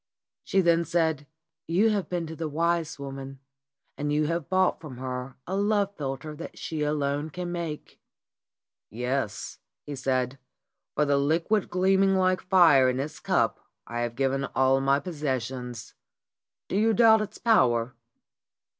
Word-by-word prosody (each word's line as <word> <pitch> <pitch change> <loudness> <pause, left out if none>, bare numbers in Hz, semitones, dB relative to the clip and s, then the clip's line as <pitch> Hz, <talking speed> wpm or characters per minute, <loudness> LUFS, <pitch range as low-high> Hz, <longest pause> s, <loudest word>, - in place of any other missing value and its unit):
She 195 - +2
then 170 -1 +3
said: 160 -4 0 0.4
"You 200 +7 +3
have 205 -3 -1
been 175 -2 -2
to 160 0 -7
the 160 -1 -4
wise 165 +1 0
woman, 135 -1 -7 0.6
and 145 0 -1
you 150 +1 +2
have 170 0 -2
bought 185 -2 +2
from 145 -6 -9
her 125 0 -5
a 190 - -3
love 205 0 +1
philter 145 +1 -5
that 165 - -8
she 160 -2 -4
alone 145 0 -1
can 175 +2 -5
make." 170 -4 -6 0.9
"Yes," 125 -1 -3 0.3
he 145 - -5
said. 130 0 -1 0.6
"For 150 - +2
the 140 -1 +2
liquid 165 +8 +1
gleaming 190 +1 +3
like 185 0 +2
fire 165 -9 +5
in 125 +1 -1
its 150 +3 -4
cup - - +1 0.3
I 120 0 -5
have 120 -1 -2
given 135 +1 0
all 130 0 +3
my 135 +1 +3
possessions. 130 -7 -4 0.7
Do - - -1
you 220 +1 +3
doubt 220 -1 +6
its 215 0 -5
power?" 125 - +3
150 Hz, 150 wpm, -27 LUFS, 135-180 Hz, 0.9 s, doubt